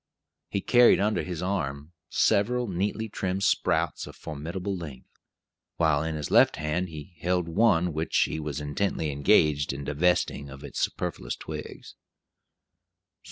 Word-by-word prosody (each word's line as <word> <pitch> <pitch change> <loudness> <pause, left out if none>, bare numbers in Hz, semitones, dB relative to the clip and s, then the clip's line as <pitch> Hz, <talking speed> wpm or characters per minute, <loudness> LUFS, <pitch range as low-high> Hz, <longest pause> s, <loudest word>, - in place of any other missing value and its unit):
He 100 - -2
carried 120 +3 +6
under 105 +2 +1
his 90 -3 -5
left 90 - -1
arm 70 -4 -3 0.2
several 120 +4 +2
neatly 100 +4 -2
trimmed 95 -2 -3
sprouts - - +1
of - - -11
formidable 85 +6 -5
length, 75 -8 -9 0.6
while 80 -3 +2
in 80 0 -2
his 75 -2 -4
left - - +6
hand 80 +4 -2
he 80 +3 -9
held 90 -1 0
one 90 -2 +3
which 80 +2 -1
he - - +1
was 75 -2 -4
intently 75 +1 -1
engaged 70 +1 +3
in 70 +1 -6
divesting 75 -1 0
of 70 0 -11
its - - -6
superfluous - - -2
twigs. - - -8
80 Hz, 145 wpm, -27 LUFS, 75-95 Hz, 0.6 s, carried